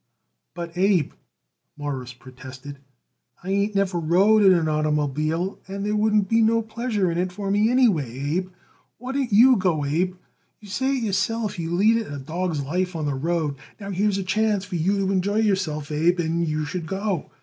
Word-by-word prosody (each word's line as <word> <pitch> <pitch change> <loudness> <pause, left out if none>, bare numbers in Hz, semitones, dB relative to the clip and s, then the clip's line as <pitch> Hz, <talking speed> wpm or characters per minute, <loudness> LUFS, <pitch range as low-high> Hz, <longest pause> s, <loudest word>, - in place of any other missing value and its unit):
"But, 170 -1 -6
Abe," 190 -6 +2 0.7
Morris 135 -4 -5
protested, 130 +3 -11 0.6
"I 190 - -4
ain't 200 +1 0
never 195 -3 +1
rode 190 +7 +4
in 195 - +7
an 170 -3 +2
oitermobile, 155 +3 -1
and 195 +1 -5
there 210 0 0
wouldn't 210 -1 +2
be 230 +3 +3
no 225 +1 +3
pleasure 220 -4 -1
in 170 - -2
it 180 0 -1
for 195 +1 -4
me, 210 +2 +3
Abe. 165 - +1 0.5
Why 250 +3 -6
don't 270 -3 -1
you 240 +5 +7
go, 175 -6 0
Abe? 175 +6 0 0.4
You 210 - -14
say 265 +8 0
it 245 - -3
yourself 210 0 -1
you 165 +1 -2
lead 215 +5 +4
it 225 -9 -4
a 145 - -5
dawg's 160 +2 -3
life 180 +5 -2
on 155 -2 -2
the 145 - -1
road. 150 0 -1 0.2
Now, 200 -1 -6
here's 200 +1 +1
a 195 - -2
chance 205 +1 0
for 185 -2 -6
you 185 +5 +1
to 190 - 0
enjoy 195 +2 0
yourself, 190 -9 0
Abe, 165 +4 +2
and 170 0 0
you 155 0 -1
should 165 +1 -5
go. 195 -2 -2
185 Hz, 185 wpm, -23 LUFS, 155-205 Hz, 0.7 s, in